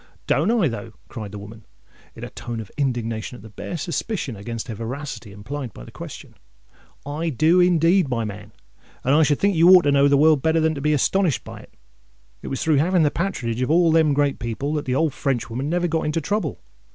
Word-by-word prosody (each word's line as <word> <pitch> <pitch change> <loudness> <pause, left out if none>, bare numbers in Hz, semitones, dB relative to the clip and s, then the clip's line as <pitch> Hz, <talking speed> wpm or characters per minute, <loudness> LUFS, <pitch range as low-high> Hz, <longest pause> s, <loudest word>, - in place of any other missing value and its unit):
"Don't 160 +8 +2
I, 225 -7 +3
though?" 115 -2 -6 0.2
cried 110 -5 -7
the 105 - -7
woman, 105 +2 -11 0.5
in - - -10
a - - -7
tone 120 -1 -6
of 110 -4 -8
indignation 120 -4 -2
at 100 - -13
the 110 - -12
bare 170 +11 -6
suspicion 170 - -3
against 115 +3 -6
her 115 - -4
veracity 115 0 -6
implied 115 +4 -7
by - - -10
the - - -12
question: - - -10 0.7
"I 155 +4 -2
do 160 +6 +3
indeed, 175 -1 +4
my 115 -3 -1
man; 105 -1 -8 0.5
and 135 - +2
I 155 - +5
should 145 -2 +3
think 200 -1 +1
you 165 +2 +6
ought 185 -1 +8
to 145 - +2
know 140 0 +5
the 140 0 +4
world 155 -1 +5
better 160 +2 +2
than 160 0 +2
to 140 - -6
be 150 +2 +2
astonished 165 +2 +1
at - - -9
it. - - -18 0.7
It - - -8
was 135 - -3
through 155 -2 +3
having 175 +4 +3
the 145 - +3
patronage 125 -11 -2
of 125 - 0
all 165 +1 +4
them 160 -3 +3
great 145 -1 +1
people, 125 +5 -3
that 150 -1 -2
the 130 -1 -1
old 155 0 +1
Frenchwoman 130 0 -2
never 175 +1 +1
got 160 -2 -1
into 155 +2 0
trouble. 205 +7 -2
145 Hz, 225 wpm, -22 LUFS, 115-165 Hz, 0.7 s, ought